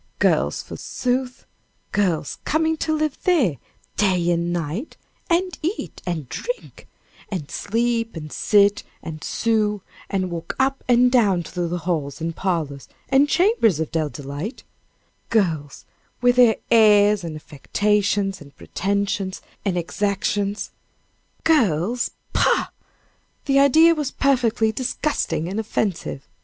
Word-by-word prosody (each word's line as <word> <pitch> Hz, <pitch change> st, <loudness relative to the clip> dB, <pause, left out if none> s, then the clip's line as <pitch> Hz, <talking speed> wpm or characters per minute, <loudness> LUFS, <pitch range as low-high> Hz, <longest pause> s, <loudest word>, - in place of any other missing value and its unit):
Girls, -, -, +1 dB
forsooth! 250 Hz, 0 st, -3 dB, 0.5 s
girls 180 Hz, -8 st, 0 dB
coming 320 Hz, +1 st, +1 dB
to 315 Hz, -, -1 dB
live 310 Hz, -2 st, -1 dB
there 275 Hz, -, +2 dB, 0.4 s
day 180 Hz, -4 st, +2 dB
and 170 Hz, 0 st, 0 dB
night, 175 Hz, -, -4 dB, 0.3 s
and 360 Hz, +2 st, 0 dB
eat, 345 Hz, +7 st, -4 dB
and 160 Hz, -6 st, -3 dB
drink, -, -, -6 dB, 0.4 s
and 175 Hz, -8 st, -5 dB
sleep, 230 Hz, +1 st, -1 dB
and 155 Hz, -2 st, -7 dB
sit, 205 Hz, -1 st, +3 dB, 0.2 s
and 160 Hz, -1 st, -7 dB
sew, 210 Hz, -3 st, 0 dB, 0.3 s
and 185 Hz, -2 st, -1 dB
walk 165 Hz, -1 st, -5 dB
up 270 Hz, +1 st, 0 dB
and 245 Hz, 0 st, +5 dB
down 200 Hz, -8 st, +3 dB
through 175 Hz, +1 st, -3 dB
the 175 Hz, +1 st, -2 dB
halls, 150 Hz, -6 st, -2 dB
and 165 Hz, 0 st, -3 dB
parlors, 160 Hz, -7 st, -2 dB, 0.2 s
and 275 Hz, +2 st, +4 dB
chambers 350 Hz, -, +3 dB
of 160 Hz, -, -2 dB
Dell 160 Hz, -2 st, 0 dB
Delight 145 Hz, -, -6 dB, 0.7 s
girls, 160 Hz, -10 st, 0 dB, 0.3 s
with 245 Hz, 0 st, +3 dB
their 240 Hz, -3 st, +6 dB, 0.2 s
airs, 210 Hz, -3 st, +5 dB
and 165 Hz, -2 st, -5 dB
affectations, 200 Hz, +6 st, 0 dB
and 145 Hz, -1 st, -15 dB
pretensions, 195 Hz, 0 st, -2 dB, 0.2 s
and 190 Hz, -3 st, 0 dB
exactions 200 Hz, +3 st, -1 dB, 0.7 s
girls 235 Hz, -, +2 dB, 0.2 s
pah! -, -, +2 dB, 0.8 s
the 275 Hz, -1 st, +3 dB
idea 315 Hz, +5 st, +6 dB
was 300 Hz, -4 st, -2 dB
perfectly 235 Hz, -6 st, +2 dB
disgusting 255 Hz, -, -1 dB
and 195 Hz, +4 st, -3 dB
offensive. 200 Hz, -9 st, -2 dB
205 Hz, 125 wpm, -22 LUFS, 170-250 Hz, 0.8 s, their